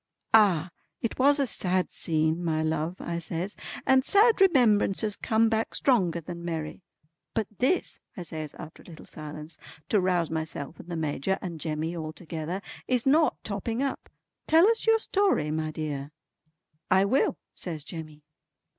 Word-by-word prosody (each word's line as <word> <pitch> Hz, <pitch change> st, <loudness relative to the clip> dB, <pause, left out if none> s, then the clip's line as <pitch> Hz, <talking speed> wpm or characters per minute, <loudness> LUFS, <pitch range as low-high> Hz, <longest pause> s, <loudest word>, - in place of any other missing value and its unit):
"Ah! 190 Hz, -6 st, +5 dB, 0.3 s
it 230 Hz, -, -2 dB
was 285 Hz, +2 st, +5 dB
a 280 Hz, -, +2 dB
sad 185 Hz, -6 st, +1 dB
scene 160 Hz, +1 st, 0 dB
my 160 Hz, -2 st, 0 dB
love" 160 Hz, +2 st, -1 dB
I 170 Hz, 0 st, -3 dB
says, 170 Hz, +4 st, -4 dB, 0.3 s
"and 265 Hz, 0 st, +5 dB
sad 415 Hz, -, +4 dB
remembrances 220 Hz, -, +4 dB
come 225 Hz, +1 st, +2 dB
back 225 Hz, 0 st, -1 dB
stronger 185 Hz, -, +2 dB
than 170 Hz, +1 st, -8 dB
merry. 165 Hz, 0 st, -4 dB, 0.5 s
But 220 Hz, -, +1 dB
this" 270 Hz, +9 st, +1 dB, 0.2 s
I 180 Hz, -, -4 dB
says 155 Hz, -2 st, -6 dB
after 155 Hz, -, -10 dB
a -, -, -19 dB
little 165 Hz, -3 st, -11 dB
silence, 155 Hz, +1 st, -9 dB, 0.3 s
to 210 Hz, -, +3 dB
rouse 180 Hz, -3 st, +1 dB
myself 160 Hz, -1 st, -4 dB
and 170 Hz, -, -11 dB
the 175 Hz, -, -3 dB
Major 160 Hz, +3 st, -1 dB
and 170 Hz, -4 st, -6 dB
Jemmy 160 Hz, +1 st, -2 dB
all 155 Hz, -2 st, -5 dB
together, 165 Hz, +3 st, -5 dB, 0.2 s
"is 250 Hz, -2 st, +1 dB
not 305 Hz, +4 st, +4 dB
topping 225 Hz, +5 st, -2 dB
up. 275 Hz, -, -3 dB, 0.4 s
Tell 325 Hz, +5 st, +6 dB
us 450 Hz, -, -2 dB
your 450 Hz, 0 st, +6 dB
story 395 Hz, -, +1 dB
my 155 Hz, 0 st, -1 dB
dear." 150 Hz, -3 st, -4 dB, 0.8 s
"I 190 Hz, +1 st, +5 dB
will" 255 Hz, +7 st, +2 dB, 0.2 s
says 160 Hz, -5 st, -5 dB
Jemmy. 155 Hz, -2 st, -8 dB
175 Hz, 160 wpm, -27 LUFS, 160-225 Hz, 0.8 s, Tell